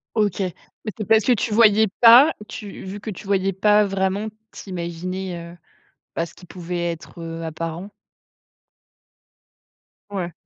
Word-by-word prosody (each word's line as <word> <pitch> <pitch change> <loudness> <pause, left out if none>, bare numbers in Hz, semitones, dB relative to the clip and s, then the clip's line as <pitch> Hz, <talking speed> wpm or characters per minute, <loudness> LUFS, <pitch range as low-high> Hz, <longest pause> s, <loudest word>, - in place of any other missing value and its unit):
OK, 210 -3 +1
mais 185 +3 -6
c'est 215 - -3
parce 220 0 +4
que 250 - +4
tu 220 -1 0
voyais 220 -1 +6
pas? 245 +7 +8
Tu 205 -2 -8
vu, 195 +2 -7
que 215 - -5
tu 195 +1 -10
voyais 195 -1 +1
pas 210 +2 +4
vraiment, 195 +1 -1 0.3
tu 195 - -10
imaginais, 175 0 -5
heu, - - -14 0.6
bah, 165 - 0
ce 170 - -14
qui 180 - -15
pouvait 175 -1 -4
être, 170 +1 -10
heu, 165 0 -6
apparent. 165 +4 -5 2.2
Ouais. 180 -4 -4
190 Hz, 150 wpm, -22 LUFS, 170-210 Hz, 2.2 s, pas